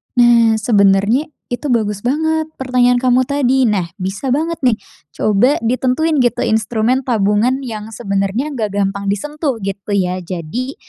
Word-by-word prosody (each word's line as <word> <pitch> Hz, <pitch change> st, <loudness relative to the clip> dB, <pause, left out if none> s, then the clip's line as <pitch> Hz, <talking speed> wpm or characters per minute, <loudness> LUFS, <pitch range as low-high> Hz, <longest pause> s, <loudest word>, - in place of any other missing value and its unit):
Nah 235 Hz, -2 st, +5 dB
sebenernya 205 Hz, -, +2 dB, 0.2 s
itu 250 Hz, +3 st, -3 dB
bagus 210 Hz, -4 st, -1 dB
banget 315 Hz, +5 st, 0 dB
pertanyaan 250 Hz, -1 st, +2 dB
kamu 255 Hz, 0 st, +3 dB
tadi, 265 Hz, -1 st, +1 dB
nah 205 Hz, -7 st, +1 dB
bisa 195 Hz, +5 st, -4 dB
banget 325 Hz, +2 st, -2 dB
nih, 250 Hz, -6 st, +2 dB, 0.4 s
coba 215 Hz, +7 st, +2 dB
ditentuin 260 Hz, +6 st, +1 dB
gitu 245 Hz, -2 st, +1 dB
instrumen 225 Hz, +4 st, 0 dB
tabungan 225 Hz, +4 st, +1 dB
yang 220 Hz, -4 st, -6 dB
sebenernya 200 Hz, +5 st, -2 dB
nggak 230 Hz, -6 st, -2 dB
gampang 200 Hz, 0 st, -1 dB
disentuh 290 Hz, -, -2 dB
gitu 195 Hz, +1 st, -3 dB
ya 185 Hz, -1 st, 0 dB
jadi, 185 Hz, -, -5 dB
240 Hz, 140 wpm, -17 LUFS, 200-260 Hz, 0.4 s, Nah